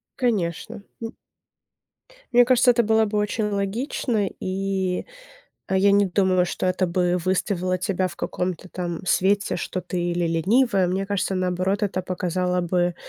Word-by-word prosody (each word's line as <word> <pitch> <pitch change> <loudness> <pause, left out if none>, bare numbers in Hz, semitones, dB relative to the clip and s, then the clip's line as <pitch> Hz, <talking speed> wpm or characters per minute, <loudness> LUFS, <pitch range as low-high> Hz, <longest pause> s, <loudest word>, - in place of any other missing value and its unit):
Конечно, 215 -2 -1 0.2
м. 225 0 -6 1.2
Мне 245 0 +6
кажется, 250 0 +5
это 235 0 +2
было 220 0 +3
бы 210 0 -2
очень 210 +1 0
логично, 210 +2 -1
и, 190 -1 -2 0.6
а, 190 - 0
я 200 +1 +4
не 200 0 +4
думаю, 185 -1 +2
что 180 - -3
это 185 0 +1
бы 180 0 +1
выставило 185 -1 0
тебя 185 0 0
в - - -12
каком-то 180 0 -3
там 175 -2 -5
свете, 200 +3 +2
что 185 +1 -3
ты 180 0 -4
или 175 0 0
ленивая, 195 +5 +2
мне 190 +2 -1
кажется, 195 -1 -1
наоборот, 185 +2 0
это 190 -2 -1
показало 180 0 -1
бы, 175 0 0
190 Hz, 150 wpm, -23 LUFS, 180-205 Hz, 1.2 s, Мне